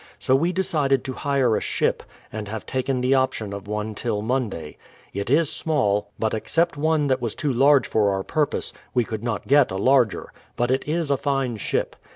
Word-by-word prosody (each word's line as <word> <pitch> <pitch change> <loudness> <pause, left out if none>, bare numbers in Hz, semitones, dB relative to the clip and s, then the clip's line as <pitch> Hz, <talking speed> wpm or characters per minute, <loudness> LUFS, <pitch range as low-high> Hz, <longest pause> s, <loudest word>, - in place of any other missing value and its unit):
So 130 - +2
we 165 +6 +2
de 190 +1 0
cided 140 -6 +1
to 130 - -4
hire 135 -4 +1
a - - -1
ship, - - 0 0.3
and 105 -1 -5
have 110 +1 -6
taken 130 0 -1
the 130 +2 +2
option 130 -6 0
of 100 0 -7
one 105 +1 -3
till 105 -1 -2
Alonday. 110 - -2 0.4
It 100 +2 -3
is 155 +4 +4
small, 105 -11 0
but 110 -1 -1
except 165 +10 0
one 155 0 +1
that 130 -2 +1
was 115 -3 -3
too 145 -3 -1
large 140 +3 +5
for 105 -2 +2
our 95 0 -1
purpose, 150 +6 -1 0.2
we 125 - +4
could 110 0 -5
not 115 -4 -3
get 140 0 +5
a 95 - -3
larger; 125 0 +2 0.2
but 120 +1 0
it 130 +2 0
is 160 -1 -1
a 140 - +3
fine 135 -3 -1
ship. - - -2
130 Hz, 205 wpm, -23 LUFS, 110-140 Hz, 0.4 s, large